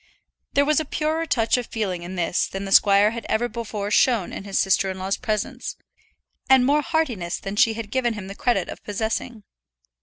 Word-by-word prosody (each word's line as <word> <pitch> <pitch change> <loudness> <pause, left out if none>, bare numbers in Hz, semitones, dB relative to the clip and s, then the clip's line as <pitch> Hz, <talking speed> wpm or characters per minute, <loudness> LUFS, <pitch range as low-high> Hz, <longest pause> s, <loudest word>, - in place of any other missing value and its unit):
There 285 - +3
was 305 0 +3
a - - -1
purer 315 +3 -1
touch 230 -2 +2
of 245 - -4
feeling 195 -6 -3
in 175 +2 -7
this 175 -1 0
than 195 +1 -5
the 195 - -6
squire 200 +1 +6
had 235 0 -6
ever 230 +2 +1
before 210 -3 -5
shown 225 -3 +2
in - - -7
his 195 -1 -1
sister 190 0 +2
in 190 - -5
law's 190 +1 -1
presence, 215 -4 -3 0.7
and 265 -1 +6
more 290 +3 +3
heartiness 265 - -1
than 195 +1 -6
she 220 +1 +3
had 220 -2 -6
given 240 -3 0
him 205 -3 -7
the 195 - -7
credit 200 -4 0
of - - -9
possessing. 220 +2 -3
220 Hz, 205 wpm, -23 LUFS, 195-250 Hz, 0.7 s, squire